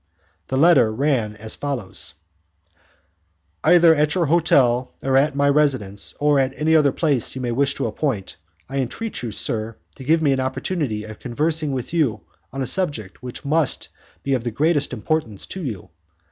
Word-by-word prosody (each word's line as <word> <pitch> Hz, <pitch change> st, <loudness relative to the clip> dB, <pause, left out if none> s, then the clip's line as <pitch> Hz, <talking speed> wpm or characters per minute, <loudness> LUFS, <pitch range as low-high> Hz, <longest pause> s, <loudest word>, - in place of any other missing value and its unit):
The 130 Hz, -, -1 dB
letter 145 Hz, -7 st, +5 dB
ran 120 Hz, -3 st, 0 dB
as, 110 Hz, +1 st, -5 dB
follows: 115 Hz, -, -4 dB, 1.5 s
"Either 170 Hz, -2 st, +6 dB
at 150 Hz, -1 st, +1 dB
your 175 Hz, -2 st, +2 dB
hotel 135 Hz, -6 st, +2 dB
or 135 Hz, 0 st, +1 dB
at 140 Hz, +2 st, +3 dB
my 140 Hz, 0 st, +2 dB
residence, 130 Hz, -9 st, +1 dB
or 145 Hz, -1 st, +3 dB
at 135 Hz, 0 st, +1 dB
any 160 Hz, +1 st, +2 dB
other 145 Hz, -3 st, +5 dB
place 140 Hz, -8 st, 0 dB
you 130 Hz, -, -4 dB
may 120 Hz, -, -1 dB
wish 140 Hz, +3 st, +1 dB
to -, -, -2 dB
appoint, 120 Hz, -11 st, -2 dB, 0.3 s
I 135 Hz, +1 st, -3 dB
entreat 205 Hz, -, -4 dB
you, 120 Hz, -, -4 dB
sir, 110 Hz, +2 st, -3 dB, 0.2 s
to 135 Hz, -, -9 dB
give 160 Hz, +4 st, +2 dB
me 145 Hz, -, +3 dB
an 135 Hz, -, +1 dB
opportunity 130 Hz, -3 st, -2 dB
of 110 Hz, 0 st, -10 dB
conversing 150 Hz, +4 st, -1 dB
with 130 Hz, +2 st, -4 dB
you 150 Hz, -10 st, +1 dB, 0.3 s
on 135 Hz, +1 st, -3 dB
a -, -, -2 dB
subject 135 Hz, -, -1 dB
which 125 Hz, +2 st, -8 dB
must 155 Hz, 0 st, 0 dB, 0.3 s
be 140 Hz, -, 0 dB
of 125 Hz, -3 st, 0 dB
the 120 Hz, -, -1 dB
greatest 145 Hz, +4 st, +1 dB
importance 150 Hz, -11 st, -2 dB
to 185 Hz, -, -7 dB
you. 100 Hz, -, -6 dB
135 Hz, 175 wpm, -22 LUFS, 120-150 Hz, 1.5 s, Either